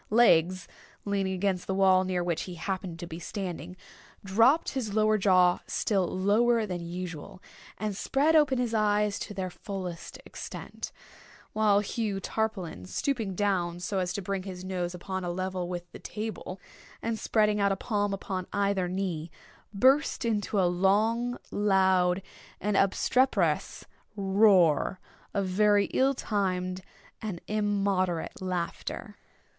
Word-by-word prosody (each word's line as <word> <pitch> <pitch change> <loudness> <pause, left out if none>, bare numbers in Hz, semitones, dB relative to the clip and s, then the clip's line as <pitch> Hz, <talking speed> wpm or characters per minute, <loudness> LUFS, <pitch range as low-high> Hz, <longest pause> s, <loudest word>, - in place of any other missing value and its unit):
Legs, 185 -5 +4 0.4
leaning 195 -2 0
against 185 -1 -1
the 190 - -1
wall 190 -1 +5
near 185 -1 -1
which 170 -2 -1
he 180 - -6
happened 185 0 -4
to 175 - -6
be 165 -1 -7
standing, 180 -2 -5 0.5
dropped 230 +11 +4
his 225 -6 -3
lower 215 0 +4
jaw 185 -3 +4
still 195 -4 0
lower 220 +5 +2
than 180 -4 -4
usual, 175 -1 -6 0.4
and 210 -1 -3
spread 285 +9 +2
open 295 -4 +4
his 245 -2 -1
eyes 210 -1 +2
to - - -6
their 185 -2 -4
fullest 180 -1 -6
extent: - - -7 0.6
while 210 -2 +4
Hugh 210 -2 -2
Tarpaulin, 195 - -3
stooping 225 - -2
down 175 -4 0
so 195 +2 -2
as 180 -1 -1
to 200 - -4
bring 195 +1 -2
his 185 -1 -7
nose 180 -1 -3
upon 190 +1 -4
a 175 - -2
level 185 0 -3
with 175 -1 -6
the - - -10
table, 210 -3 -6 0.4
and 225 -1 -2
spreading 210 -1 +2
out 200 0 +3
a - - +1
palm 205 0 -1
upon 190 -2 -4
either 200 -2 +1
knee, 175 -3 -3 0.4
burst 260 +6 +3
into 210 -2 0
a 185 - +4
long, 215 +7 +2
loud, 190 -2 +3 0.4
and 210 0 -1
obstreperous 195 - +2 0.3
roar 190 -4 +4 0.4
of 200 -1 +1
very 205 +2 +3
ill 270 +1 +3
timed 185 -5 -1 0.4
and 205 -6 -4
immoderate 200 -5 0
laughter. 185 +3 -4
195 Hz, 140 wpm, -28 LUFS, 180-210 Hz, 0.6 s, wall